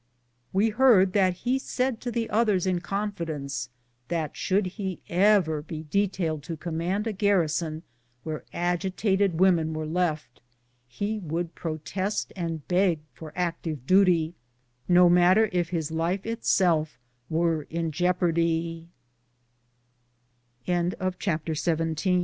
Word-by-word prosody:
We 205 +4 +2
heard 210 -6 +5
that 190 -3 +3
he 255 +2 +2
said 255 -3 -2
to 245 - -3
the 230 -1 -1
others 210 -4 +2
in 185 -2 +1
confidence, 160 - -3 0.4
that 165 -4 -2
should 195 +1 +1
he 190 0 -4
ever 180 -4 +3
be 155 0 -7
detailed 180 -6 0
to 165 - -5
command 175 +5 -2
a 225 - -2
garrison 170 -5 0 0.4
where 155 -1 -5
agitated 190 +1 0
women 170 -4 +3
were 155 0 -3
left, 155 -5 -2 0.5
he 205 - -3
would 170 -1 -3
protest 175 +5 -3
and 165 -5 -4
beg 180 -3 +2
for 160 -2 -10
active 165 -6 -3
duty, 180 -2 +4 0.5
no 180 0 +6
matter 180 +5 +5
if 175 -2 0
his 160 -3 -2
life 170 +4 -1
itself 175 - +1 0.3
were 165 -2 0
in 165 0 -2
jeop 165 -1 0
175 Hz, 115 wpm, -26 LUFS, 160-195 Hz, 0.5 s, no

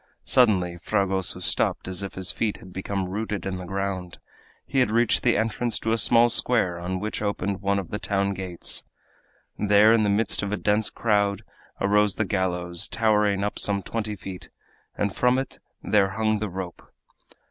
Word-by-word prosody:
Suddenly 90 -8 +3
Fragoso 95 -1 -1
stopped - - 0
as 95 0 0
if 100 - -6
his 95 -1 -1
feet 110 -3 -2
had 95 - -14
become 95 0 -3
rooted 105 +2 -4
in 95 -1 -3
the 90 - -7
ground. 95 -2 -4 0.5
He 135 - 0
had 125 -4 +3
reached 115 +1 +2
the 120 -4 +2
entrance 115 +2 -1
to 110 - -2
a 115 - +2
small 120 +1 +5
square, 115 -7 +2
on 90 +2 -3
which 105 +2 -4
opened 100 -2 -2
one 100 0 +1
of 95 -4 -5
the 105 - -3
town 100 -1 0
gates. 95 -3 -3 0.8
There, 105 +2 +5
in 115 - +4
the 105 - +2
midst 100 0 +1
of 100 0 -3
a 105 - -1
dense 105 +1 +1
crowd, 100 -2 0 0.4
arose 105 0 +2
the 110 - 0
gallows, 90 -3 -2
towering 105 -3 +2
up 105 - -2
some 100 -1 0
twenty 110 -2 -3
feet, 95 -1 -9 0.5
and 100 -1 -1
from 125 +1 +3
it 135 0 -4 0.2
there 100 -2 +3
hung 110 +1 0
the 105 -1 -3
rope! 90 -1 -6
100 Hz, 180 wpm, -25 LUFS, 95-110 Hz, 0.8 s, small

